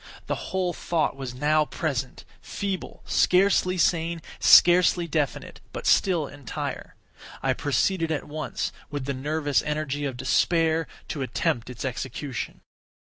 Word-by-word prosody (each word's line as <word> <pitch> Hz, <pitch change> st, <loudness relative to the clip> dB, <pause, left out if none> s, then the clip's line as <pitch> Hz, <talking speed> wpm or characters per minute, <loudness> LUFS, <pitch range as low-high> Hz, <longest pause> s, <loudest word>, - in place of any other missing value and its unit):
The -, -, -4 dB
whole 185 Hz, -2 st, 0 dB
thought 165 Hz, -4 st, -1 dB
was 130 Hz, -2 st, -6 dB
now 150 Hz, +3 st, +3 dB
present—feeble, 155 Hz, -, -5 dB
scarcely 185 Hz, 0 st, +3 dB
sane, 165 Hz, -1 st, +1 dB, 0.2 s
scarcely 175 Hz, 0 st, +6 dB
definite,—but 150 Hz, -4 st, -4 dB
still 175 Hz, -6 st, +3 dB
entire. 140 Hz, -4 st, -6 dB, 0.5 s
I -, -, +2 dB
proceeded 165 Hz, +4 st, 0 dB
at 155 Hz, -, -1 dB
once, 150 Hz, -4 st, -3 dB, 0.2 s
with 145 Hz, -3 st, -4 dB
the 140 Hz, -, -2 dB
nervous 145 Hz, +1 st, 0 dB
energy 150 Hz, -1 st, -2 dB
of 130 Hz, -3 st, -3 dB
despair, 165 Hz, +3 st, +2 dB, 0.2 s
to 145 Hz, -, -3 dB
attempt 120 Hz, -2 st, -1 dB
its 125 Hz, +1 st, -6 dB
execution. 130 Hz, 0 st, -5 dB
150 Hz, 120 wpm, -26 LUFS, 135-170 Hz, 0.5 s, scarcely